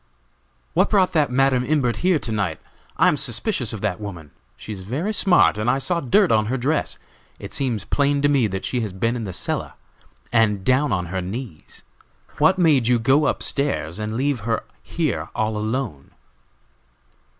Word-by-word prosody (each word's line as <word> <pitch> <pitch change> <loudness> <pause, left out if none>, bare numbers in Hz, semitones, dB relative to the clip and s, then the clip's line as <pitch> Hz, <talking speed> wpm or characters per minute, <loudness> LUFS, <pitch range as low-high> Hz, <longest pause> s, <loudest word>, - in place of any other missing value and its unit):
"What - - +3
brought 190 -3 +3
that 150 -5 +2
Madam 130 0 +2
Imbert 130 -4 0
here 180 -2 +2
to 125 - -5
night? 100 -7 -1 0.4
I - - +5
am 150 - +3
suspicious 135 - -1
of 110 -3 -6
that 105 -3 -1
woman. 90 -8 -8 0.3
She 110 - -7
is 95 - -8
very 145 - -3
smart, 180 - +4
and 110 +3 0
I 130 - +3
saw 170 +5 0
dirt 180 - +3
on 110 -1 +3
her 130 +4 -1
dress. 145 +5 -1 0.4
It - - -9
seems 125 -6 -1
plain 140 0 +1
to - - +5
me 140 -6 +3
that 95 -1 -4
she 125 - -1
has 105 -4 -4
been 115 +5 -1
in 115 -3 -4
the 95 - -5
cellar, - - -3 0.6
and 105 -4 +2
down 130 +2 +2
on 90 -3 0
her 95 - -1
knees. 95 - -7 0.6
What 185 +6 +4
made 150 -9 +3
you 125 0 +4
go 135 +6 +3
up - - 0
stairs 140 - -1
and 110 +1 -3
leave 140 0 0
her 115 +2 -2 0.2
here 160 -5 -2
all 110 -2 -1
alone?" 110 - -3
125 Hz, 185 wpm, -22 LUFS, 105-145 Hz, 0.6 s, I